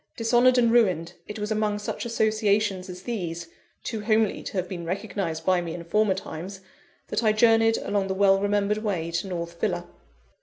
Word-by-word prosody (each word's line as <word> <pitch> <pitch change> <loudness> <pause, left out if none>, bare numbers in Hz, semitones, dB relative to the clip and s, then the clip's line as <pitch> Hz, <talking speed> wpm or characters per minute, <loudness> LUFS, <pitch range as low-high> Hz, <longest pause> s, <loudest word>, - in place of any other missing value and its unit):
Dishonoured 240 +2 +4
and 235 -2 +4
ruined, 185 -8 +2
it 210 - -6
was 210 0 -4
among 215 -1 0
such 210 - -5
associations 215 -4 +1
as 180 0 -9
these 170 -7 -4 0.3
too 220 -2 -4
homely 215 0 +1
to - - -7
have 185 -2 -1
been 175 -2 -6
recognised 185 -2 -3
by 185 -1 +3
me 170 -2 -5
in 170 - -7
former 200 +3 +2
times 190 +1 -7 0.5
that 210 +3 -1
I 215 -1 +4
journeyed 225 0 +4
along 200 -1 -1
the 190 - -2
well 195 0 +4
remembered 205 +1 +1
way 180 -6 -2
to 170 +3 -2
North 170 -2 -5
Villa. - - -1
205 Hz, 185 wpm, -25 LUFS, 180-220 Hz, 0.5 s, Dishonoured